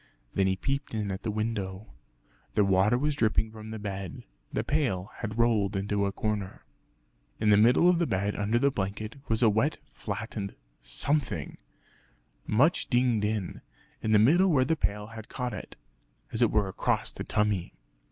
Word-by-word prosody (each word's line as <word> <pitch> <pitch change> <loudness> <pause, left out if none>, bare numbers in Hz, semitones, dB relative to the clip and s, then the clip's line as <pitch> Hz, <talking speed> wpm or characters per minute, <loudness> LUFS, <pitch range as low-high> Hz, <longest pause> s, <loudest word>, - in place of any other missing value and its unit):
Then 95 -1 +2
he 95 - +2
peeped 135 +5 -3
in 105 -2 -2
at 95 +1 -4
the 115 - -3
window. 105 -2 -3 0.6
The 105 - +4
water 100 +4 +3
was 150 +3 0
dripping 110 -4 +1
from 110 0 -10
the 110 - -5
bed, 100 -3 -6 0.3
the - - -1
pail 115 -11 -1
had 110 -1 -5
rolled 110 -4 +2
into 100 +1 0
a - - -1
corner. 105 -2 -3 0.7
In 105 -1 +3
the - - +7
middle 120 +11 +5
of 180 -2 +4
the 170 - +1
bed 100 +2 -1
under 105 +3 +1
the 140 +3 +3
blanket, 105 -1 -3 0.2
was 115 +1 +3
a 115 - +7
wet 110 +9 +1 0.2
flattened 105 -1 -5 0.3
something 145 -3 -1 0.9
much 140 +11 +3
dinged 120 -4 +2
in, 105 -3 -3 0.4
in 110 - -1
the 110 - +6
middle 160 - +5
where 135 -6 +4
the 160 - +1
pail 105 -7 -1
had 110 0 -10
caught 125 -1 -3
it - - -8 0.6
(as 110 - -2
it 120 - +5
were 105 -2 +2
across 95 - -1
the - - -5
tummy). 105 -4 0
110 Hz, 175 wpm, -28 LUFS, 100-120 Hz, 0.9 s, the